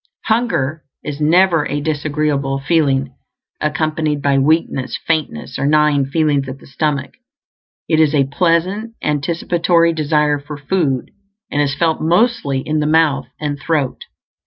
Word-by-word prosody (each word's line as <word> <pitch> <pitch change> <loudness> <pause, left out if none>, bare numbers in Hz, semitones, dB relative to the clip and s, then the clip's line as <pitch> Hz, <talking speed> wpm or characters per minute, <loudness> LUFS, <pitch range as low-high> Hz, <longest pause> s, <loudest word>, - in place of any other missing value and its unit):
Hunger 165 - 0 0.2
is 150 0 -5
never 165 0 +3
a 145 +2 -2
disagreeable 145 -2 -1
feeling, 135 -3 +1 0.5
accompanied 155 0 -1
by 140 -1 +2
weakness, 140 -2 0
faintness, 155 - -2
or 140 - 0
gnawing 150 -2 +3
feelings 145 -2 +1
at 130 - -7
the - - -17
stomach; 140 +1 -2 0.7
it 160 -2 +2
is 155 -1 +3
a 140 - +4
pleasant, 180 - 0
anticipatory 170 +3 +1
desire 150 -1 +1
for 145 +1 -8
food, 145 -3 -1 0.4
and 145 - +1
is 140 -2 0
felt 160 +1 0
mostly 170 - +1
in 155 +2 -1
the 150 - 0
mouth 150 -5 +2
and 145 -1 -3
throat. 140 -3 -1
150 Hz, 135 wpm, -17 LUFS, 140-165 Hz, 0.7 s, a